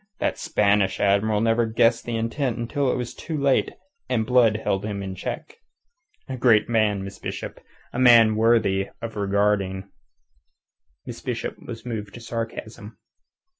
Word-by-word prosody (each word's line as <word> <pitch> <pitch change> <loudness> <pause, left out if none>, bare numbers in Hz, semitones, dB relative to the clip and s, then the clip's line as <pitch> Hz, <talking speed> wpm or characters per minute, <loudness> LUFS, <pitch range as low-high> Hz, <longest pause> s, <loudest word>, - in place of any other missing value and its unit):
That - - -1
Spanish 100 - +1
Admiral 105 +1 +2
never 115 +1 +2
guessed 115 +1 +2
the 120 - -3
intent 115 +2 -2
until 130 +3 -1
it - - -1
was 125 -1 -4
too 160 -2 -5
late 140 -2 +1 0.4
and 115 -3 +1
Blood 120 -3 +4
held 95 0 0
him 100 -2 -4
in 95 -1 -5
check. 450 - -6 0.7
A 130 -2 -5
great 115 -4 +4
man, 110 -4 +1
Miss 95 0 -9
Bishop. - - -6 0.3
A 120 - -3
man 115 -3 +6
worth 115 0 +3 0.5
regarding." 100 -1 0 1.1
Miss - - -8
Bishop - - -4
was 115 0 -8
moved 105 -4 -5
to - - -8
sarcasm. 115 -2 -6
115 Hz, 145 wpm, -24 LUFS, 105-120 Hz, 1.1 s, man